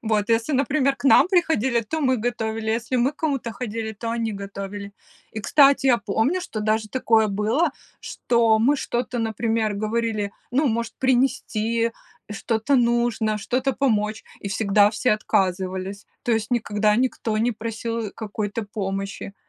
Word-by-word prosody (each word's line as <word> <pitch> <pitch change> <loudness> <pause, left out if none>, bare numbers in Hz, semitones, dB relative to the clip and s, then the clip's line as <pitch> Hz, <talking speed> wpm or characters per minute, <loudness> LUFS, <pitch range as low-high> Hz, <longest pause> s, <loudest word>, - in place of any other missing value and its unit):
Вот, 215 -2 0
если, 230 +5 +1
например, 275 0 +2
к - - -15
нам 280 - +6
приходили, 315 - +2
то 315 +9 -4
мы 260 -3 +2
готовили, 225 -1 -2
если 230 +3 -2
мы 250 +1 +3
к - - -37
кому-то 275 -8 -2
ходили, 225 -2 -4
то 230 +2 -5
они 230 -1 -1
готовили. 200 0 -7 0.4
И, 220 - -4
кстати, 275 +4 +4
я 240 -2 +5
помню, 225 - 0
что 230 -11 -5
даже 215 0 0
такое 225 -2 +2
было, 215 - +1 0.3
что 230 -2 +1
мы 275 +6 +3
что-то, 245 -2 -3
например, 225 -1 0
говорили: 215 -1 -1 0.2
"Ну, 280 +2 +2
может, 230 +1 -2
принести, 235 -3 +1 0.4
что-то 220 +6 0
нужно, 235 -3 +1
что-то 255 +5 -1
помочь?" 215 -6 0 0.2
И 200 - -6
всегда 205 0 +3
все 230 +3 0
отказывались. 190 -1 -1 0.2
То - - -2
есть 220 +1 0
никогда 210 -3 +1
никто 235 -2 0
не 230 +3 +2
просил, 230 +1 -4
э, - - -6
какой-то 215 0 -4
помощи. 195 -1 -5
225 Hz, 155 wpm, -23 LUFS, 210-245 Hz, 0.4 s, нам